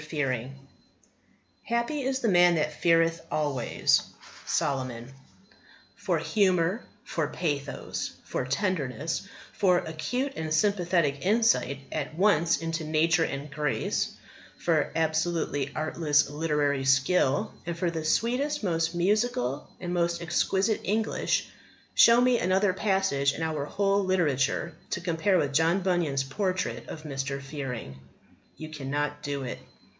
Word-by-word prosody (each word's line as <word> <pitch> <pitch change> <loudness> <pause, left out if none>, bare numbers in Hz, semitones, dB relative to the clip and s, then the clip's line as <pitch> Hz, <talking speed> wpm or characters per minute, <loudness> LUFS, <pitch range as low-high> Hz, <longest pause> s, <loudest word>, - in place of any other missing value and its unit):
FEARING 135 -4 -3 1.1
"Happy 235 +5 -1
is 265 0 -1
the 235 - +1
man 175 -3 +5
that 155 -1 0
feareth 165 -1 +2
alway." 145 -5 -2 0.6
Solomon 130 -2 -2 0.8
For 195 -4 -1
humour, 185 +3 +1 0.2
for 160 -3 -2
pathos, 145 -3 -3
for - - -2
tenderness, 155 0 -2 0.3
for 180 -3 +3
acute 245 - -2
and 160 -1 -4
sympathetic 170 -5 +1
insight 210 -9 +2
at 155 0 -4
once 170 -3 +3
into 165 0 -3
nature 160 +2 +2
and 140 -1 -4
grace, 150 -1 -1 0.4
for - - +1
absolutely 160 -3 0
artless 150 -2 +1
literary 145 -3 0
skill, 135 +2 +2
and 170 -1 -3
for 170 0 0
the 160 -2 -4
sweetest, 250 - 0
most 165 -2 0
musical, 175 - 0
and 175 -1 -4
most 170 -1 0
exquisite 190 +5 +1
English, 220 +3 0 0.5
show 235 +1 +7
me 250 -1 +4
another 185 +2 +2
passage 190 -9 +1
in 160 - -4
our 155 -3 -2
whole 200 +4 +1
literature 170 -3 +1 0.2
to - - -2
compare 180 +2 +1
with 140 -3 0
John 165 +5 +3
Bunyan's 170 -7 +1
portrait 185 +7 -2
of 155 - -7
Mr. 135 -2 -3
Fearing. 135 - -6 0.6
You 155 - -7
cannot 145 0 -3
do 140 -2 -3
it. 125 - -5
165 Hz, 125 wpm, -27 LUFS, 145-185 Hz, 1.1 s, show